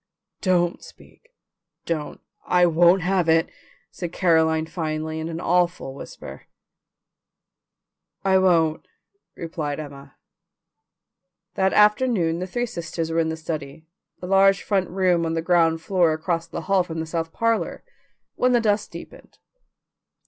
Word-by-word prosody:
"Don't 175 -2 +1
speak, 475 - -17 0.6
don't, 155 -3 -4 0.3
I 180 0 +4
won't 175 +2 +4
have 180 -2 +1
it!" 165 0 +3 0.4
said 175 -2 -6
Caroline 160 -3 +2
finally 160 -1 -4
in 160 +1 -4
an 165 0 -5
awful 175 -5 0
whisper. 140 - -10 1.8
"I 190 -1 +4
won't," 165 -4 +2 0.5
replied 155 -3 -4
Emma. 140 -2 -10 1.4
That 190 0 +1
afternoon 210 -6 +3
the 185 - -4
three 240 +6 -2
sisters 165 -5 -5
were 165 - +1
in 160 -1 +1
the 160 - -4
study, 155 -2 -6 0.3
the - - -7
large 195 +1 +4
front 195 -3 0
room 180 -2 +1
on 165 0 -1
the 165 - -1
ground 165 -2 +2
floor 175 -4 +2
across 165 +1 -2
the - - -6
hall 195 -1 +2
from 165 -2 -5
the 160 - -3
south 165 0 -3
parlour, 230 +3 -1 0.5
when 250 0 +1
the 240 - +4
dusk 210 -2 0
deepened. - - -12
170 Hz, 135 wpm, -23 LUFS, 160-190 Hz, 1.8 s, I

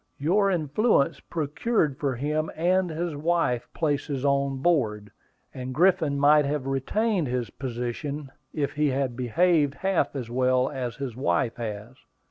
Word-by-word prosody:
"Your 195 +8 +2
influence 170 - +1
procured 155 - -1
for 135 -3 -1
him 150 +5 -1
and 180 +2 +2
his 165 0 -3
wife 155 -5 0
places 145 -3 -1
on 140 -1 +1
board; 110 -10 0 0.4
and 130 0 -6
Griffin 165 -4 +3
might 150 +1 +6
have 145 -1 -2
retained 170 - 0
his 125 -1 -2
position, 130 +3 -5 0.2
if 145 -2 -2
he 150 0 +1
had 135 -2 -1
behaved 145 +3 +2
half 180 -5 0
as 125 -4 -4
well 130 +2 +1
as 125 -5 -4
his 135 -5 -5
wife 115 -1 0
has." 110 0 -5
140 Hz, 140 wpm, -26 LUFS, 130-160 Hz, 0.4 s, might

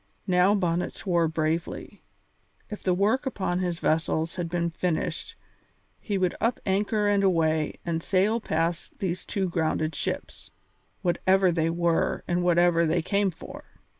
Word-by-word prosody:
Now 180 +3 +4
Bonnet 175 -3 -1
swore 170 -3 +1
bravely. 160 +1 -3 0.7
If 210 - -6
the 185 - +1
work 220 +9 +1
upon 190 -7 -1
his 175 -2 -1
vessels 160 0 0
had 175 -2 -4
been 170 0 -1
finished 165 0 -2 0.6
he 205 -3 -2
would 185 -2 +1
up 230 +2 +1
anchor 205 +2 +1
and 200 -1 +3
away 160 -4 +2
and 165 -1 -1
sail 200 +6 +2
past 165 -2 -2
these 185 -2 -3
two 195 -2 -1
grounded 160 -2 -1
ships, - - -5 0.5
whatever 185 +1 +3
they 165 -1 +1
were 170 0 0
and 175 0 +1
whatever 175 -1 +3
they 165 +1 +1
came 200 +3 +1
for. 170 - -10
175 Hz, 145 wpm, -26 LUFS, 165-195 Hz, 0.7 s, Now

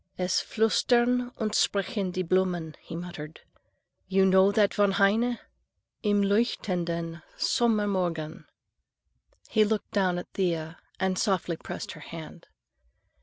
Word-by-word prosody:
"Es 180 -1 +1
flüstern 245 +2 +2
und 215 -2 -2
sprechen 200 -1 +1
die 185 +1 -2
Blumen,"— 175 -3 0
he - - -8
muttered. 165 -3 -8 0.7
"You 190 0 +3
know 190 +1 +5
that 205 -1 +3
von 205 -2 +3
Heine? 225 +5 +3 0.6
Im 205 -1 +2
leuchtenden 175 -6 -1 0.2
Sommermorgen?" 190 -9 0 1.0
He 220 - +3
looked 215 -1 -1
down 185 -3 +1
at 175 - -7
Thea 165 -4 -2 0.2
and 190 -1 0
softly 185 -5 0
pressed - - -7
her 155 - -11
hand. 165 +2 -10
190 Hz, 120 wpm, -27 LUFS, 170-210 Hz, 1.0 s, know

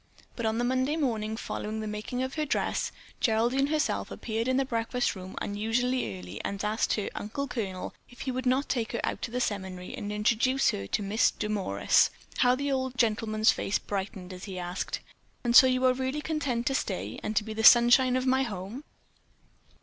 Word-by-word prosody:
But 235 -2 -1
on 220 +1 0
the 240 - 0
Monday 260 +4 +1
morning 220 -7 -1
following 215 -1 -4
the 215 - -4
making 215 +4 -3
of 260 +1 -3
her 310 - -1
dress, 300 - -1 0.3
Geraldine 240 +4 +2
herself 305 0 0
appeared 225 +1 -3
in 260 0 +2
the 270 - +2
breakfast 235 -1 -1
room 185 0 -8
unusually 225 - -1
early 90 +2 -8
and 200 +1 -3
asked 215 +2 +1
her 210 - -2
"uncle 280 +7 -4
colonel" 200 -7 -4 0.2
if 245 - -13
he 265 - -2
would 255 0 -2
not 260 +3 +2
take 235 -4 -1
her 235 - -1
out - - -2
to - - -3
the 245 +2 -2
seminary 190 -5 -3
and 205 - -5
introduce 235 +5 +2
her 100 0 -5
to 205 - -1
Miss 205 +3 +3
Demorest. 195 - +2 0.3
How 250 0 +4
the 280 +2 -2
old 260 -1 -1
gentleman's 220 -2 +3
face 195 - -1
brightened 190 -2 -5
as 180 +1 -8
he 190 -3 -6
asked: 180 +1 -3 0.4
"And 240 -1 +1
so 260 - +10
you 255 0 +2
are 255 - +5
really 260 +3 -2
content 280 -7 -1
to 270 - +1
stay - - -2
and 215 - +1
be 220 - -5
the 220 +1 -3
sunshine 245 +2 +7
of 255 0 0
my 260 0 +3
home?" 215 +2 -5
230 Hz, 195 wpm, -28 LUFS, 210-255 Hz, 0.4 s, so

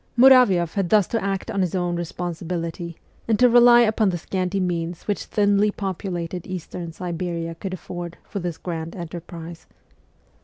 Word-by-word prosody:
Muravioff 235 -10 +6
had 195 -4 -1
thus 210 -1 +5
to 230 - -1
act 195 +3 -2
on 200 -3 0
his 180 0 -1
own 175 -1 0
responsibility, 170 0 -4 0.3
and 225 -2 +2
to 250 - +6
rely 240 0 +7
upon 215 -2 +3
the 175 - -1
scanty 185 +2 -2
means 175 -2 -2
which 205 - -2
thinly 205 0 +2
populated 180 -3 -4
Eastern 175 -2 -6
Siberia 170 -1 -4
could 185 +3 -5
afford 175 -2 -7
for 200 - -5
this 175 -3 -4
grand 165 -2 -5
enterprise. 170 -1 -8
180 Hz, 155 wpm, -23 LUFS, 170-200 Hz, 0.3 s, rely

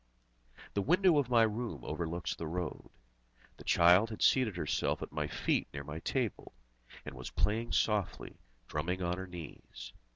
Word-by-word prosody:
The 100 - +1
window 175 - +4
of 135 -4 -1
my 120 -2 +5
room 110 - -2
overlooks 85 0 -3
the 80 - -6
road. 85 +1 -4 0.7
The - - -12
child 90 +6 +5
had 110 - -3
seated 115 -8 +3
herself 75 -4 -1
at - - -7
my - - -2
feet - - 0
near 70 - -4
my 75 +2 -6
table, 120 +4 -2 0.5
and - - -6
was 65 -1 -7
playing 115 +3 0
softly, 105 -4 0 0.3
drumming 90 +5 -2
on 90 +1 -1
her 95 - -5
knees. 75 -8 -9
90 Hz, 160 wpm, -33 LUFS, 80-115 Hz, 0.7 s, my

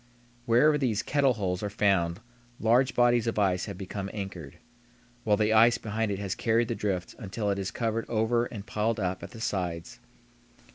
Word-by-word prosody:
Wherever 150 +6 +4
these 115 -7 0
"kettle 140 -2 +2
holes" 95 -5 -2
are 105 - -2
found 100 -3 +1 0.4
large 120 +4 +3
bodies 120 -1 +3
of 115 - -1
ice 95 -3 +1
have 100 -3 -7
become 95 0 -5
anchored, 95 -8 -7 0.7
while 105 -2 +2
the 110 +1 +2
ice 115 +2 +6
behind 110 -1 -2
it 100 - -2
has 100 -1 -3
carried 115 0 +1
the - - 0
drift 95 -5 -3
until 105 0 -2
it 100 - -2
is 95 -1 -2
covered 115 +1 -2
over 115 +1 +1
and 105 -4 -8
piled 105 +2 -1
up 95 -1 -2
at - - -8
the 115 - -11
sides. 90 -7 -3
105 Hz, 185 wpm, -28 LUFS, 95-115 Hz, 0.7 s, ice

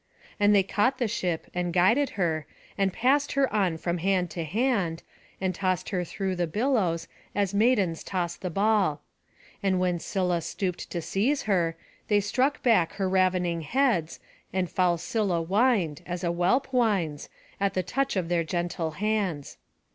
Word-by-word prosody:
And 205 0 +5
they 195 - +5
caught 205 +7 +1
the 245 - 0
ship, 180 -6 -2
and 175 -1 -1
guided 225 +11 +3
her, 160 -5 0 0.3
and 195 -1 +1
passed 275 +8 +2
her 275 -5 +1
on 190 -6 +1
from 170 +1 -2
hand 180 -1 +1
to 170 +1 -3
hand, 190 - 0 0.4
and 190 -1 -1
tossed 185 0 -1
her 185 -3 -1
through 190 +2 -3
the 175 -1 0
billows, 205 - 0 0.3
as 200 -1 0
maidens 200 -6 +2
toss 175 -3 -2
the 180 - -5
ball. 195 -5 +1 0.6
And 190 -2 +1
when 180 -1 +1
Scylla 180 -2 -1
stooped 180 +1 -4
to 170 -2 -4
seize 250 - 0
her, 170 -5 +1 0.3
they 205 -1 +4
struck 255 +8 0
back 200 -10 +3
her 195 -2 -1
ravening 185 -2 +1
heads, 205 - 0 0.3
and 185 -1 -1
foul 180 -2 +2
Scylla 185 -2 -1
whined, 195 - +1
as 175 +1 -4
a 170 - +1
whelp 185 +11 +2
whines, 195 - 0 0.3
at 200 0 0
the 185 - +1
touch 275 +8 -1
of 185 -3 -1
their 170 -1 +1
gentle 170 0 -2
hands. 200 -8 -1
185 Hz, 165 wpm, -27 LUFS, 175-210 Hz, 0.6 s, And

